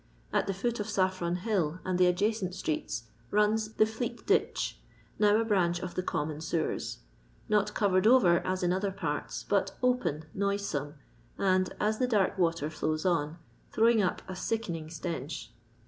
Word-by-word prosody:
At -, -, +2 dB
the 195 Hz, -, 0 dB
foot 235 Hz, +4 st, -1 dB
of 210 Hz, -, -2 dB
Saffiron 185 Hz, -3 st, 0 dB
hill 180 Hz, -4 st, -1 dB
and 185 Hz, -1 st, 0 dB
the 180 Hz, -, +6 dB
adjacent 185 Hz, 0 st, 0 dB
streets 155 Hz, -9 st, -2 dB, 0.3 s
runs 215 Hz, +1 st, +2 dB
the 215 Hz, -, +4 dB
Fleet 225 Hz, +2 st, -4 dB
ditch, 410 Hz, -, +1 dB, 0.4 s
now 210 Hz, 0 st, +5 dB
a 230 Hz, -, +1 dB
branch 175 Hz, -5 st, +2 dB
of 180 Hz, -1 st, -5 dB
the -, -, -1 dB
common 155 Hz, -3 st, -3 dB
sewers; 160 Hz, 0 st, -2 dB, 0.5 s
not 210 Hz, -1 st, +1 dB
covered 190 Hz, -1 st, +3 dB
over 200 Hz, -9 st, +6 dB
as 185 Hz, 0 st, -2 dB
in 175 Hz, 0 st, +2 dB
other 195 Hz, +2 st, 0 dB
parts, 195 Hz, -, -3 dB
but -, -, +1 dB
open, 245 Hz, -12 st, +1 dB
noisome, 200 Hz, -7 st, -1 dB, 0.4 s
and, 185 Hz, -1 st, +2 dB
as 215 Hz, +1 st, +1 dB
the 255 Hz, -, +2 dB
dark 210 Hz, -6 st, +2 dB
water 165 Hz, -3 st, +1 dB
flows 155 Hz, +1 st, -2 dB
on, 165 Hz, -3 st, +1 dB, 0.3 s
throwing 225 Hz, 0 st, +4 dB
up 185 Hz, -, -1 dB
a 185 Hz, -, -5 dB
sickening 180 Hz, -6 st, -3 dB
stench. 160 Hz, -3 st, -5 dB
185 Hz, 165 wpm, -30 LUFS, 170-215 Hz, 0.5 s, the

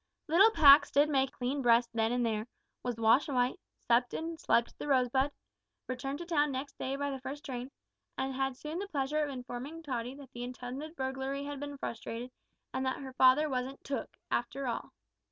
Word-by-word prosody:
Little 360 Hz, +8 st, +7 dB
Pax 285 Hz, -8 st, +8 dB
did 290 Hz, +2 st, +4 dB
make 270 Hz, -2 st, +2 dB
a -, -, -30 dB
clean 260 Hz, +3 st, -2 dB
breast 235 Hz, -1 st, +4 dB
then 225 Hz, 0 st, +1 dB
and 245 Hz, 0 st, +1 dB
there, 220 Hz, 0 st, -1 dB, 0.3 s
was 245 Hz, -1 st, -2 dB
washed 230 Hz, +7 st, +4 dB
white, 250 Hz, -2 st, +1 dB, 0.2 s
supped 240 Hz, +1 st, +2 dB
and 325 Hz, 0 st, -4 dB
slept 235 Hz, -8 st, +2 dB
at -, -, -24 dB
The -, -, -5 dB
Rosebud, 265 Hz, 0 st, +2 dB, 0.5 s
returned 265 Hz, +2 st, -3 dB
to 345 Hz, -, -6 dB
town 295 Hz, -4 st, +2 dB
next 270 Hz, +2 st, -5 dB
day 265 Hz, +1 st, -2 dB
by 285 Hz, 0 st, -2 dB
the 270 Hz, -, -4 dB
first 280 Hz, +3 st, -6 dB
train, 250 Hz, -2 st, -5 dB, 0.5 s
and 265 Hz, 0 st, -1 dB
had 270 Hz, -1 st, -1 dB
soon 310 Hz, +5 st, -5 dB
the 400 Hz, -, -4 dB
pleasure 295 Hz, -2 st, 0 dB
of 295 Hz, -, -2 dB
informing 265 Hz, +4 st, -6 dB
Tottie 250 Hz, -3 st, -3 dB
that 275 Hz, -2 st, -12 dB
the 240 Hz, -, -7 dB
intended 255 Hz, +5 st, -6 dB
burglary 265 Hz, 0 st, -3 dB
had 285 Hz, -1 st, -5 dB
been 285 Hz, 0 st, -6 dB
frustrated, 235 Hz, 0 st, -5 dB, 0.4 s
and 260 Hz, -, -1 dB
that 260 Hz, 0 st, 0 dB
her 265 Hz, -1 st, -8 dB
father 260 Hz, +4 st, +5 dB
wasn't 265 Hz, 0 st, -3 dB
"took" 270 Hz, -5 st, -4 dB
after 270 Hz, +3 st, -1 dB
all. 240 Hz, -, -3 dB
265 Hz, 200 wpm, -32 LUFS, 250-285 Hz, 0.5 s, Pax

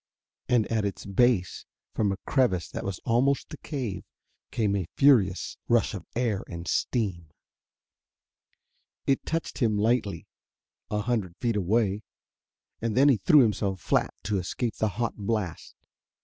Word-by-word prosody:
And 120 Hz, -4 st, +3 dB
at 110 Hz, -2 st, +1 dB
its 100 Hz, -1 st, -4 dB
base, 100 Hz, -1 st, +1 dB, 0.3 s
from 105 Hz, -3 st, +1 dB
a 95 Hz, -, -3 dB
crevice 100 Hz, -, +2 dB
that -, -, -5 dB
was 100 Hz, -3 st, -4 dB
almost 130 Hz, +4 st, +1 dB
a -, -, -6 dB
cave, 130 Hz, -, -4 dB, 0.5 s
came 105 Hz, -3 st, 0 dB
a 95 Hz, -4 st, -2 dB
furious 115 Hz, -10 st, +3 dB
rush -, -, +2 dB
of -, -, -7 dB
air 115 Hz, -5 st, 0 dB
and 85 Hz, 0 st, -7 dB
steam. 95 Hz, -, -1 dB, 1.8 s
It 135 Hz, -, 0 dB
touched 165 Hz, 0 st, -3 dB
him 110 Hz, -5 st, +2 dB
lightly 105 Hz, -4 st, 0 dB, 0.6 s
a 105 Hz, 0 st, -1 dB
hundred 105 Hz, -6 st, -2 dB
feet 115 Hz, -3 st, 0 dB
away, 105 Hz, +1 st, +1 dB, 0.8 s
and 115 Hz, 0 st, -1 dB
he 125 Hz, -, +3 dB
threw 145 Hz, +9 st, +6 dB
himself 100 Hz, -4 st, +1 dB
flat -, -, +1 dB
to 105 Hz, -1 st, 0 dB
escape 110 Hz, +6 st, -3 dB
the 110 Hz, -, +1 dB
hot 120 Hz, -1 st, -1 dB
blast. 105 Hz, -4 st, -3 dB
105 Hz, 140 wpm, -27 LUFS, 95-120 Hz, 1.8 s, threw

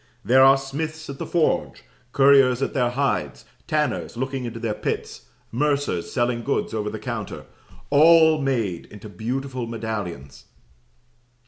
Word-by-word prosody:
There 130 Hz, +2 st, +5 dB
are 135 Hz, 0 st, +7 dB
smiths 155 Hz, +3 st, -5 dB
at 135 Hz, -, -10 dB
the -, -, -5 dB
forge, 170 Hz, -3 st, 0 dB, 0.3 s
curriers 135 Hz, -2 st, +5 dB
at -, -, -2 dB
their 125 Hz, -4 st, +1 dB
hides, 135 Hz, +3 st, -2 dB, 0.2 s
tanners 150 Hz, -5 st, -1 dB
looking 130 Hz, 0 st, -3 dB
into 115 Hz, -1 st, -6 dB
their 115 Hz, -2 st, -2 dB
pits, -, -, -5 dB, 0.2 s
mercers 140 Hz, -, -1 dB
selling 120 Hz, -1 st, 0 dB
goods 140 Hz, -1 st, -2 dB
over 105 Hz, -1 st, -2 dB
the 110 Hz, -, -6 dB
counter 115 Hz, -4 st, -6 dB, 0.5 s
all 160 Hz, +1 st, +6 dB
made 115 Hz, -10 st, -2 dB
into 105 Hz, +1 st, -11 dB
beautiful 125 Hz, +5 st, -4 dB
medallions. 100 Hz, -, -6 dB
125 Hz, 135 wpm, -23 LUFS, 110-140 Hz, 0.5 s, are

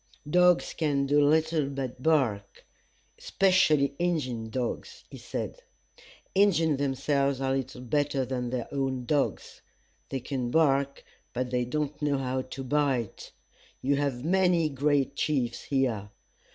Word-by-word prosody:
"Dogs 180 Hz, +2 st, +4 dB
can 145 Hz, -4 st, 0 dB
do 145 Hz, +1 st, +3 dB
little 155 Hz, 0 st, +2 dB
but 135 Hz, -3 st, -5 dB
bark; 130 Hz, -10 st, 0 dB, 0.5 s
'specially 155 Hz, -7 st, +3 dB
Injin 130 Hz, -10 st, -1 dB
dogs," 125 Hz, +1 st, -4 dB
he -, -, -9 dB
said. -, -, -5 dB, 0.7 s
"Injins 165 Hz, -7 st, +3 dB
themselves 140 Hz, 0 st, 0 dB
are 135 Hz, 0 st, 0 dB
little 130 Hz, -1 st, -4 dB
better 140 Hz, +1 st, 0 dB
than 125 Hz, -1 st, -3 dB
their 125 Hz, -1 st, -3 dB
own 135 Hz, -2 st, -2 dB
dogs. 120 Hz, -, -1 dB, 0.5 s
They 135 Hz, -, -2 dB
can 125 Hz, -1 st, -3 dB
bark, 140 Hz, -2 st, +2 dB, 0.3 s
but 125 Hz, 0 st, -2 dB
they 125 Hz, -1 st, 0 dB
don't 150 Hz, +3 st, -3 dB
know 145 Hz, -1 st, +1 dB
how 130 Hz, -1 st, -1 dB
to 130 Hz, +1 st, -7 dB
bite. 135 Hz, -5 st, -1 dB, 0.5 s
You 140 Hz, +2 st, +2 dB
have 140 Hz, -2 st, -2 dB
many 180 Hz, -2 st, +3 dB
great 140 Hz, 0 st, +1 dB
chiefs 130 Hz, -6 st, -1 dB
here. 120 Hz, -7 st, 0 dB
140 Hz, 130 wpm, -28 LUFS, 130-150 Hz, 0.7 s, Dogs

